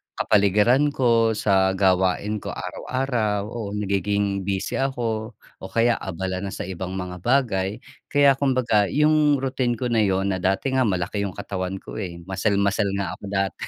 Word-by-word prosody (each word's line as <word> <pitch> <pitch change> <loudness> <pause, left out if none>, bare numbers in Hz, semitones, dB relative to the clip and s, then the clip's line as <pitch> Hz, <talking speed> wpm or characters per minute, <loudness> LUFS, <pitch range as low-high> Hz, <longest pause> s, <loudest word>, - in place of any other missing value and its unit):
kapaligiran 105 +7 +3
ko, 115 -3 +3
sa 95 -2 +2
gawain 95 +2 +1
ko - - -9
araw-araw, 120 -6 -2
oo, 115 -4 -5
nagiging 100 -1 -1
busy 95 -1 -2
ako 115 -5 -2 0.2
o 95 - -7
kaya 115 +2 +2
abala 95 0 -4
na 95 0 -5
sa - - -5
ibang 95 0 -5
mga 90 -1 -5
bagay. 105 -5 +1 0.3
Kaya 140 -2 +4
kumbaga 125 -7 +2
yung 150 +1 +3
routine 130 -2 -1
ko 125 +1 -3
na 115 - +2
'yon 95 -1 +1
na 95 - -2
dati 95 +8 0
nga 130 -2 +2
malaki 100 +2 -1
yung 95 - -8
katawan 95 -2 -4
ko, 95 - -8
eh, 85 -3 -6
muscle 95 +3 -1
muscle 100 0 +1
nga 100 -1 -2
ako - - -22
dati. 95 -1 -2
100 Hz, 165 wpm, -23 LUFS, 95-120 Hz, 0.3 s, Kaya